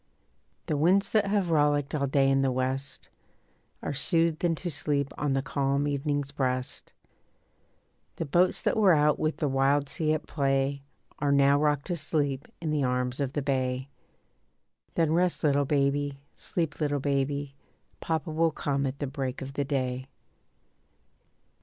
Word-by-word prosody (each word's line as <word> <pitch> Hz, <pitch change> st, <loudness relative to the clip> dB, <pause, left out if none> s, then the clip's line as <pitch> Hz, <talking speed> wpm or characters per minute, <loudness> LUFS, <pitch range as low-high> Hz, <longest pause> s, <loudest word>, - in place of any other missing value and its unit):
The 155 Hz, -, -1 dB
winds 180 Hz, +7 st, +3 dB
that 210 Hz, -2 st, +3 dB
have 200 Hz, -4 st, +1 dB
rollicked 145 Hz, -2 st, +2 dB
all 140 Hz, -2 st, 0 dB
day 135 Hz, 0 st, +3 dB
in 135 Hz, 0 st, +3 dB
the 135 Hz, -1 st, +2 dB
west 130 Hz, +2 st, -2 dB, 0.8 s
Are -, -, -2 dB
soothed 165 Hz, +3 st, +2 dB
into 175 Hz, +1 st, 0 dB
sleep 140 Hz, -1 st, -1 dB
on 145 Hz, -2 st, -1 dB
the 135 Hz, 0 st, 0 dB
calm 140 Hz, -1 st, 0 dB
evening's 145 Hz, 0 st, -1 dB
breast. 130 Hz, -2 st, -2 dB, 1.2 s
The 165 Hz, -, -3 dB
boats 175 Hz, +5 st, +2 dB
that -, -, +1 dB
were 200 Hz, -6 st, +5 dB
out 150 Hz, 0 st, +3 dB
with 155 Hz, 0 st, 0 dB
the 150 Hz, -, 0 dB
wild 135 Hz, +1 st, +2 dB
sea 155 Hz, +1 st, 0 dB
at 155 Hz, -, -3 dB
play 135 Hz, -1 st, 0 dB, 0.4 s
Are 145 Hz, -1 st, +1 dB
now 140 Hz, 0 st, +4 dB
rocked 150 Hz, -2 st, +1 dB
to 175 Hz, -, -2 dB
sleep 145 Hz, -2 st, -1 dB
in 160 Hz, -2 st, -2 dB
the 150 Hz, -2 st, +1 dB
arms 125 Hz, 0 st, -1 dB
of 140 Hz, -1 st, -1 dB
the 145 Hz, -, -2 dB
bay. 130 Hz, -1 st, -1 dB, 1.1 s
Then 160 Hz, -2 st, +2 dB
rest 175 Hz, +1 st, +1 dB
little 145 Hz, -1 st, +3 dB
baby, 140 Hz, 0 st, 0 dB
sleep 165 Hz, -3 st, -3 dB
little 145 Hz, -1 st, +1 dB
baby, 140 Hz, 0 st, -1 dB, 0.5 s
Papa 160 Hz, 0 st, -2 dB
will 165 Hz, +1 st, +2 dB
come 140 Hz, -2 st, -1 dB
at 135 Hz, +1 st, -4 dB
the 145 Hz, -, -3 dB
break 135 Hz, -1 st, -4 dB
of 135 Hz, +1 st, -8 dB
the 140 Hz, -, -1 dB
day. 130 Hz, -2 st, -2 dB
145 Hz, 160 wpm, -28 LUFS, 135-155 Hz, 1.2 s, were